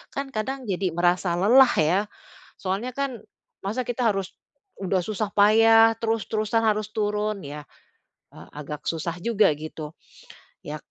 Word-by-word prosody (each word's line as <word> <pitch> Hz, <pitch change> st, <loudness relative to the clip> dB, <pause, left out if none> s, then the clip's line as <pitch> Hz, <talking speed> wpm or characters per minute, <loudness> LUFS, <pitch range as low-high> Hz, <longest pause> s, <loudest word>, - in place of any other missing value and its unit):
kan 275 Hz, 0 st, -4 dB
kadang 265 Hz, +4 st, -3 dB
jadi 190 Hz, -5 st, -2 dB
merasa 175 Hz, 0 st, +1 dB
lelah 240 Hz, +9 st, +5 dB
ya. 160 Hz, +5 st, +3 dB, 0.6 s
Soalnya 200 Hz, +7 st, -4 dB
kan 275 Hz, -4 st, -3 dB, 0.4 s
masa 220 Hz, +6 st, -3 dB
kita 245 Hz, 0 st, -1 dB
harus 195 Hz, -1 st, -4 dB, 0.5 s
udah 190 Hz, -1 st, 0 dB
susah 215 Hz, +1 st, -3 dB
payah 225 Hz, +2 st, +6 dB
terus-terusan 225 Hz, 0 st, -1 dB
harus 215 Hz, -1 st, +1 dB
turun, 210 Hz, -1 st, -1 dB
ya, 145 Hz, 0 st, -8 dB, 0.6 s
eee, -, -, -14 dB
agak 150 Hz, 0 st, -8 dB
susah 165 Hz, +1 st, -3 dB
juga, 210 Hz, +2 st, +2 dB
gitu. 155 Hz, 0 st, -7 dB, 0.7 s
Ya, 150 Hz, +1 st, -6 dB
210 Hz, 130 wpm, -24 LUFS, 175-225 Hz, 0.7 s, payah